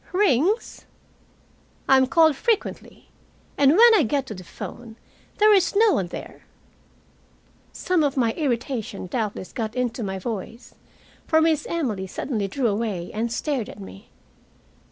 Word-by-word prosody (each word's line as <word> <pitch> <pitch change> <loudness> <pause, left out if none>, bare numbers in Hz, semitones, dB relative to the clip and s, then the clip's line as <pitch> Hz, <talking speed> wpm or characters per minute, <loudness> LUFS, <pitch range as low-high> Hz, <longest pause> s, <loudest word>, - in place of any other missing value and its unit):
"Rings?" 380 - +1 1.0
"I 265 - +6
am 260 -1 +4
called 320 +1 +4
frequently 455 - -3 0.5
and 280 0 +4
when 470 +1 +8
I 430 - +5
get 275 +1 0
to 225 - -7
the 185 -2 -10
phone, 230 +5 -9 0.4
there 425 0 +6
is 380 -1 +2
no 430 -1 +5
one 185 - 0
there." - - -10 1.3
Some 360 -3 0
of 285 -1 -1
my 235 -3 +2
irritation 240 - -3
doubtless 210 -1 -4
got 225 -1 -4
into 250 -1 -2
my 190 -3 -3
voice, 225 +3 -7 0.5
for 315 - +4
Miss 320 -2 +1
Emily 230 - -2
suddenly 210 0 -3
drew 255 +6 -3
away 205 -5 -2
and 225 +2 -2
stared 260 -2 -2
at - - -11
me. 95 0 -12
250 Hz, 145 wpm, -23 LUFS, 215-315 Hz, 1.3 s, when